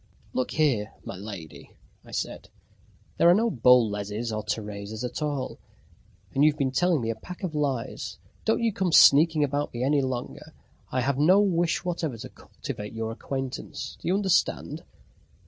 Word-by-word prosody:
"Look 130 - -1
here, 130 -9 +1
my - - -6
lady," 95 -5 -9 0.3
I - - -17
said, - - -4 0.7
"there 170 - +6
are 175 - +7
no 230 +2 +2
Boleses 115 - +2
or 110 0 -2
Teresas 105 +1 -4
at 125 +5 -4
all, 145 -4 -3 0.7
and 140 - +3
you've 150 0 +4
been 135 -3 0
telling 175 +1 +2
me 115 0 -1
a - - -4
pack 180 - -10
of 180 -4 -2
lies. 140 -6 -2 0.3
Don't 225 +1 +1
you 225 -2 +2
come 190 -3 0
sneaking 155 +1 +7
about 145 +1 -1
me 120 - -2
any 140 +2 +3
longer. 130 -2 -5 0.4
I 130 - 0
have 135 +1 0
no 180 +7 +6
wish 175 -4 +1
whatever 165 -8 -2
to 130 +3 -8
cultivate 110 -6 -8
your 115 0 -3
acquaintance. 130 - -5
Do - - -6
you 180 - +3
understand?" 195 -3 +1
135 Hz, 165 wpm, -26 LUFS, 115-160 Hz, 0.7 s, are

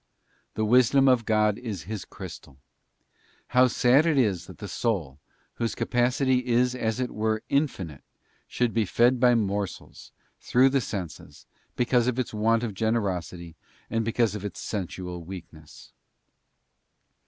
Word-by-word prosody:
'* - - -40
The 110 - 0
Wisdom 130 +4 +4
of 125 -3 +3
God 105 -2 +2
is 105 - -5
His 105 0 -6
crystal. 65 - -10 0.9
How 125 +1 +5
sad 125 +6 +3
it 155 -3 +2
is 105 -9 +1
that - - -12
the - - -7
soul, 85 - -2 0.4
whose 115 -1 -2
capacity 125 +1 +1
is 125 +1 +2
as 110 -2 -2
it 125 -1 -2
were 110 0 -1
infinite, 95 - -1 0.5
should 120 -2 -1
be 115 - +2
fed 120 +6 +3
by 125 -1 +5
morsels 100 -3 -3 0.3
through 130 +2 +3
the 135 0 +1
senses, 85 -9 -7 0.3
because 125 -1 +2
of 125 -1 0
its 130 -3 -2
want 115 +2 +2
of 115 -4 -3
generosity, 90 -6 -2 0.4
and 115 0 0
because 115 -1 +1
of 105 -2 -6
its 100 -3 -6
sensual 90 -3 -5
weakness. 85 -3 -12
115 Hz, 145 wpm, -26 LUFS, 95-125 Hz, 0.9 s, How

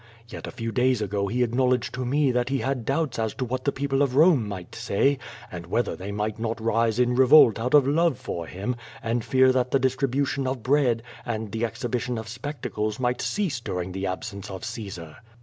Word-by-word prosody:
Yet - - -8
a - - -6
few 115 -1 -4
days 125 0 +2
ago 100 -1 -1
he 125 +5 +1
acknowledged 125 0 +1
to 130 - -3
me 140 +2 +2
that 125 0 0
he 135 - +1
had 135 -4 -2
doubts 135 -3 0
as 110 -1 -1
to 130 - -2
what 130 +1 -4
the 140 - +3
people 135 0 -1
of 135 -3 +1
Rome 150 - +5
might 95 -4 -7
say, 135 +7 +1 0.3
and 85 -2 -7
whether 120 +7 0
they 95 +2 -6
might 105 +1 -3
not 115 0 -2
rise 115 0 +1
in 125 0 +3
revolt 130 -2 +7
out 125 +6 +2
of 145 -3 +6
love 165 +4 +2
for 85 -10 -5
him, 100 +9 -3 0.3
and 115 +1 -1
fear 130 +2 +4
that 125 -1 +1
the 135 - +2
distri 130 +1 +1
bution 135 +1 0
of 130 -4 -4
bread 125 -4 +2 0.2
and 110 -3 -4
the 115 +2 -2
exhibition 120 +1 -3
of 110 0 -6
spectacles 120 -3 -4
might 125 -1 0
cease 185 - -1
during 90 -5 -4
the 95 +1 -3
absence 100 +2 -5
of 95 -1 -6
Caesar. 100 -9 -7
120 Hz, 215 wpm, -25 LUFS, 110-130 Hz, 0.3 s, revolt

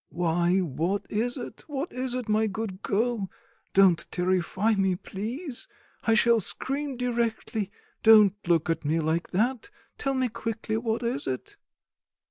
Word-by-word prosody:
"Why, 175 +2 +2
what 175 +5 -1
is 240 +5 0
it, 245 - -8
what 295 +2 -4
is 250 0 -2
it, 250 -3 -3
my 215 +1 +2
good 200 -2 -4
girl? 215 -1 0 0.5
Don't 185 -5 +5
terrify 185 +4 +1
me, 190 -2 +2
please; 240 - -6 0.4
I 225 - +4
shall 230 +1 +5
scream 275 +6 -2
directly; 235 -4 -1 0.3
don't 215 -3 +7
look 170 -3 +3
at 165 -2 -1
me 155 +3 +1
like 160 +2 0
that; 235 - 0 0.3
tell 275 -1 0
me 260 -1 +2
quickly, 220 -1 -3
what 225 0 -1
is 250 +4 -1
it?" 130 -1 -4
220 Hz, 145 wpm, -27 LUFS, 185-240 Hz, 0.5 s, don't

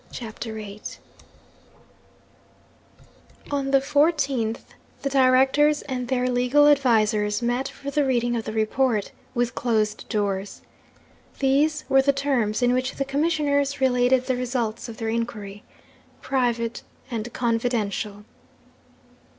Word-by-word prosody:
CHAPTER 225 -1 -7
VIII 210 -1 -8 2.7
On 280 -1 -1
the 275 - +5
14th 280 -5 +1 0.4
the 275 - -1
Directors 270 +3 +4
and 255 -3 -4
their 250 0 0
legal 250 +4 +3
advisers 220 -6 +2
met 245 +3 0
for 280 0 -7
the 295 0 +2
reading 240 -3 +1
of 225 - -3
the - - -4
report, 220 0 0 0.2
with 240 +1 0
closed 220 -4 -1
doors. 200 -2 -2 0.8
These 295 +3 +1
were 270 -1 +5
the 280 +1 +2
terms 255 -5 0
in 245 0 +3
which 255 +1 -1
the 275 - -2
Commissioners 285 -1 0
related 250 0 +3
the 260 - 0
results 240 -2 -3
of 225 - -9
their 225 -1 -3
inquiry: 210 -3 -4 0.6
'Private 240 -3 -1 0.3
and 230 0 -4
confidential. 225 -4 -1
245 Hz, 120 wpm, -24 LUFS, 225-275 Hz, 2.7 s, the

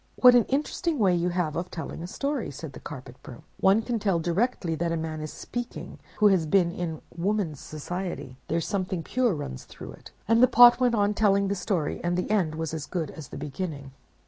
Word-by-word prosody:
"'What 250 -1 +8
an 245 -2 +5
interesting 300 +4 -1
way 195 -6 +3
you 175 0 +1
have 175 -4 -1
of 175 +1 -3
telling 160 -1 -6
a 175 - -5
story!' 280 +4 -2
said 145 +1 -8
the - - -9
Carpet 130 -3 -9
Broom. 120 - -11 0.2
'One 200 +4 +4
can 235 0 -2
tell 195 -4 +1
directly 175 +1 0
that 170 +1 -1
a 165 - 0
man 160 -1 -4
is 155 - -5
speaking 245 0 -6 0.2
who 210 -1 +6
has 180 -5 +2
been 175 +1 +3
in 170 -3 -5
woman's 175 -4 -1
society. 175 -3 -5
There's 165 0 -1
something 185 -4 -2
pure 245 +1 +1
runs 65 - -6
through - - -10
it.' - - -13 0.2
"And 230 +2 +4
the 255 - +8
Pot 240 +1 +8
went 245 -2 +3
on 205 -1 +2
telling 200 -2 +2
the 200 - 0
story, 180 -5 -2
and 175 0 0
the 180 - -2
end 180 -8 +1
was 160 0 -3
as 155 -2 -4
good 170 -4 -3
as 155 -4 -9
the - - -9
beginning. 145 -1 -5
180 Hz, 220 wpm, -27 LUFS, 160-215 Hz, 0.2 s, What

